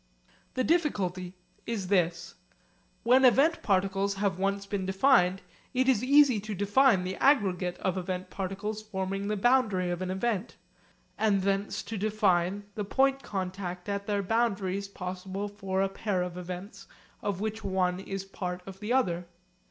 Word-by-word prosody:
The 255 - +1
difficulty 190 - 0 0.3
is 205 -6 -3
this: 175 -2 +1 0.7
When 255 +3 +5
event 275 +6 +5
particles 195 0 +1
have 195 -3 -1
once 200 +1 0
been 200 -1 -3
defined 190 -2 +3 0.3
it 255 +1 +2
is 250 -4 +3
easy 280 -3 +5
to 215 +1 -5
define 205 +1 +4
the 185 +1 -4
aggregate 190 -10 +2
of 185 0 -1
event 185 0 -4
particles 200 +3 -4
forming 195 -1 -3
the 210 0 -1
boundary 210 -6 +2
of 175 +1 -3
an 185 - -2
event; 205 +2 -2 0.6
and 200 -3 +2
thence 195 +1 -1
to 205 0 -5
define 200 -2 +1
the 210 - -3
point 270 +6 +2
contact 185 -2 -4
at 200 0 -3
their 205 -1 0
boundaries 200 -3 0
possible 190 +1 -5
for 195 -2 -2
a - - +2
pair 195 -2 -1
of 180 -1 -5
events 185 +2 -7 0.3
of 200 -3 -2
which 220 +1 -3
one 185 -2 0
is 195 0 -5
part 180 -2 -5
of 195 0 -10
the 210 +3 -4
other. 180 -10 +1
195 Hz, 155 wpm, -29 LUFS, 185-215 Hz, 0.7 s, When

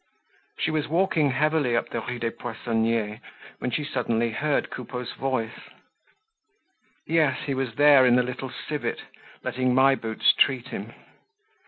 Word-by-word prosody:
She 160 - 0
was 155 -1 -1
walking 165 -2 +2
heavily 145 -2 +1
up - - -2
the 115 - -3
Rue 125 +2 -5
des 115 -1 -2
Poissonniers 115 -2 -2 0.4
when - - -2
she 150 - -1
suddenly 120 -5 -1
heard 150 +5 -1
Coupeau's 125 -2 -6
voice. 125 -4 -3 1.4
Yes, 155 -5 +2
he 140 - -1
was 130 -4 -3
there 145 -1 +7
in 120 - +5
the 125 - +4
Little 130 +1 -5 0.2
Civet, 150 -1 -3 0.4
letting 130 0 0
My 135 +1 +6
Boots 110 -4 +2
treat 130 -1 +2
him. 115 -2 -6
130 Hz, 145 wpm, -25 LUFS, 115-145 Hz, 1.4 s, there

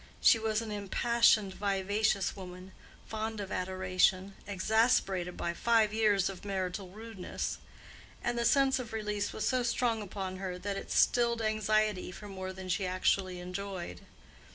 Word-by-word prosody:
She 225 - +6
was 220 0 0
an 220 - -6
impassioned, 210 0 +3
vivacious 200 +1 0
woman, 185 0 -9 0.3
fond 220 0 -4
of 200 -2 -5
adoration, 185 +1 +1
exasperated 195 -3 +1
by 170 - -2
five 220 +2 +3
years 210 -4 +3
of 195 -2 -6
marital 190 -1 -3
rudeness; 215 -1 -5 0.6
and 240 - 0
the 235 - 0
sense 265 +2 +4
of 235 -3 -6
release 210 -2 -2
was - - -2
so 255 -1 +2
strong 235 -1 0
upon 190 -2 -5
her 185 -1 -4
that 200 +2 -3
it - - -6
stilled 235 -1 +3
anxiety 215 -3 +1
for 210 +3 -10
more 190 -1 -5
than 190 0 -8
she 185 +1 0
actually 185 0 +1
enjoyed. 180 - -5
200 Hz, 150 wpm, -31 LUFS, 185-220 Hz, 0.6 s, She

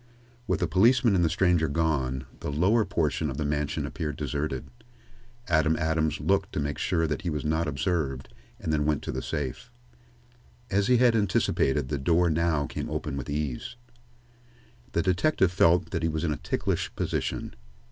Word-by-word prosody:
With - - 0
the - - +2
policeman 115 +3 +4
and 90 -2 +3
the 80 - +3
stranger 85 -2 +2
gone, 70 -4 0
the - - -4
lower 100 +10 +3
portion 80 -4 0
of 65 - -5
the 75 - -1
mansion 75 0 -1
appeared 75 -1 -4
deserted. 70 -1 -3 0.8
Adam 80 -2 +3
Adams 80 -2 0
looked - - +1
to - - -1
make 75 0 -2
sure 80 -1 +1
that 75 -2 -2
he 90 - -2
was 75 -2 -3
not 80 +2 0
observed, 70 -3 -1 0.3
and 80 - -2
then 75 -1 +1
went 75 -2 0
to - - -3
the - - -3
safe. 75 - -4 1.0
As 100 +1 +2
he 125 - +5
had 120 -1 +4
anticipated, 75 -9 +1
the 70 -2 -2
door 85 +4 +3
now 80 -2 +1
came - - -5
open - - -3
with 70 -3 -5
ease. 75 - -3 1.2
The 85 - +1
detective 95 - +2
felt 90 0 +3
that 80 - -1
he 80 - +1
was 80 +1 -2
in 80 -3 +1
a - - -5
ticklish 75 +1 -2
position. - - -2
80 Hz, 175 wpm, -27 LUFS, 75-90 Hz, 1.2 s, he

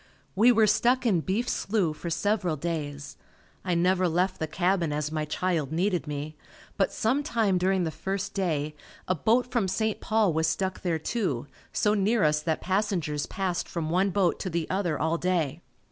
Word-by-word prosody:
We 225 +6 +6
were 225 -2 +5
stuck 240 +5 +2
in 190 -8 +3
Beef 210 +9 -1
Slough 195 -7 0
for 170 - -5
several 190 -1 0
days. 145 -2 -4 0.5
I 180 -2 0
never 180 +2 +3
left 180 +3 0
the 160 - -1
cabin 175 0 +1
as 150 0 -2
my 155 -1 -1
child 155 -2 -1
needed 180 0 0
me, 150 +1 -5 0.4
but - - +1
some 250 +6 +1
time 225 - +1
during 185 0 +2
the 160 - -1
first 195 +5 -4
day 155 -6 -1 0.3
a 185 - +2
boat 235 - +1
from 230 -6 +1
St. 220 +3 -1
Paul 215 -5 +2
was 160 0 +1
stuck 190 -1 -1
there 175 -4 0
too, 160 - -2 0.3
so 210 - +2
near 210 +2 +2
us 150 0 +3
that 160 0 -1
passengers 185 -7 -1
passed 185 -3 -2
from 160 -2 -3
one 185 +3 +2
boat 190 -3 +1
to 185 - -3
the 165 -2 -2
other 180 -5 0
all 160 +2 0
day. 175 -6 0
180 Hz, 185 wpm, -27 LUFS, 160-200 Hz, 0.5 s, We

